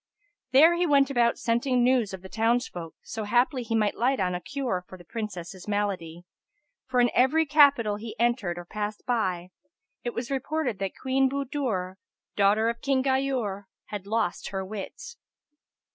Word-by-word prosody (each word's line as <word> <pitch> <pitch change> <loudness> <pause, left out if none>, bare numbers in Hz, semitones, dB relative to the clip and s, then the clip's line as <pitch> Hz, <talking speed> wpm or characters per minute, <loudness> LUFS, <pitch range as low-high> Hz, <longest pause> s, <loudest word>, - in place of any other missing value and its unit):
[FN#285] 260 - +6
Here 325 +3 +8
he 355 - +2
went 280 -2 +4
about 235 -3 +2
scenting 245 +2 +1
news 245 -4 +3
of 190 -1 -8
the - - -8
townsfolk, 225 -6 -1
so 220 - -5
haply 245 +5 +2
he 230 -1 -2
might 210 -2 +2
light 260 +3 +1
on 180 -1 0
a 180 - -3
cure 245 -5 -3
for 185 - -11
the 175 - -14
Princess's 190 -3 -6
malady, 190 -5 -2 0.6
for 255 -1 +1
in 245 -1 +4
every 310 +6 +4
capital 280 -8 +4
he 220 +1 -7
entered 235 -7 +1
or 175 - -7
passed 210 +2 -5
by, 185 -7 -1 0.5
it 240 - -4
was 235 +3 -4
reported 270 - -2
that 195 -1 -4
Queen 265 0 +2
Budur, 255 -9 -2 0.4
daughter 205 +2 +3
of 235 0 -2
King 270 -2 +1
Ghayur, 260 -7 0 0.2
had 205 -2 -6
lost 215 -4 -1
her 190 -1 -3
wits. 215 - -8
230 Hz, 170 wpm, -27 LUFS, 195-260 Hz, 0.6 s, Here